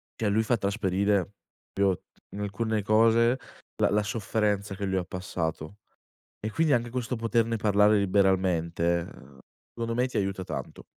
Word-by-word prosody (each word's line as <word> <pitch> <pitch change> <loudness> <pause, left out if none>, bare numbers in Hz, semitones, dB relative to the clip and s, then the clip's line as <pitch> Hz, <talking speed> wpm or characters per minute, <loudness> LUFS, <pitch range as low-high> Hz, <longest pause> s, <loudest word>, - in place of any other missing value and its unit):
cioè 110 - -1
lui 110 +2 +2
fa 120 - +2
trasparire 100 -1 +1
proprio 95 - -24 1.0
in 100 - -5
alcune 105 +2 -1
cose, 115 +4 +4 0.4
la - - +4
la 105 +1 +2
sofferenza 105 -2 -1
che 100 - -4
lui 95 -1 0
ha 90 - -2
passato 85 -1 -4 0.6
e 110 - -4
quindi 160 +3 +2
anche 120 -1 0
questo 125 0 -2
poterne 115 0 +1
parlare 105 0 +4
liberamente, 95 -4 +2
ehm, 70 -5 -11 0.3
secondo 115 0 -3
me 125 +2 +2
ti 125 - -4
aiuta 95 -1 -1
tanto. - - -6
105 Hz, 155 wpm, -27 LUFS, 95-115 Hz, 1.0 s, cose